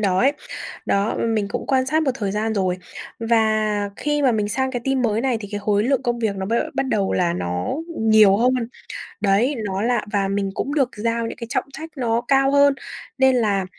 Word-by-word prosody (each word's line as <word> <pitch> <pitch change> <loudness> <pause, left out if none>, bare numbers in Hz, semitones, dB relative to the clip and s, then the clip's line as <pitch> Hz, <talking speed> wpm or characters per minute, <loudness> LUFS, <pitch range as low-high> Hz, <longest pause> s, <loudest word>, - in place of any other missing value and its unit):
đó 190 -3 +1
ấy. 270 +6 +4 0.5
Đó, 200 +2 +1
m 225 -1 0
mình 205 -2 0
cũng - - -4
quan 260 -1 +2
sát 315 +3 +2
một 285 - +1
thời 205 -6 -3
gian 220 +2 -1
rồi 185 -3 0 0.4
và 215 -2 +1
khi 295 0 -1
mà 260 -3 +4
mình 210 -2 0
sang 260 +5 0
cái 245 -2 -3
team 270 -1 +1
mới 220 -2 +1
này 255 -2 0
thì 205 - -7
cái 205 - -3
khối 205 0 +1
lượng 270 +1 +1
công 240 -2 -1
việc 220 -4 -1
nó 190 0 -3
b 220 - -3 0.2
bắt 270 - 0
đầu 200 -6 0
là 175 -2 +1
nó 90 - -2 0.3
nhiều 215 -3 +6
hơn, 250 +4 +3 0.7
đấy, 210 +8 +2
nó 195 0 -2
là 240 -1 +1
và 200 -2 +1
mình 195 0 -1
cũng 280 - -3
được 275 -4 +2
giao 230 +1 -1
những - - -7
cái 235 - -7
trọng 270 - -1
trách 320 +3 -7
nó 235 -2 0
cao 270 0 +3
hơn, 285 0 +5 0.4
nên 265 -1 +4
là, 205 -5 +1
225 Hz, 225 wpm, -22 LUFS, 205-260 Hz, 0.7 s, nhiều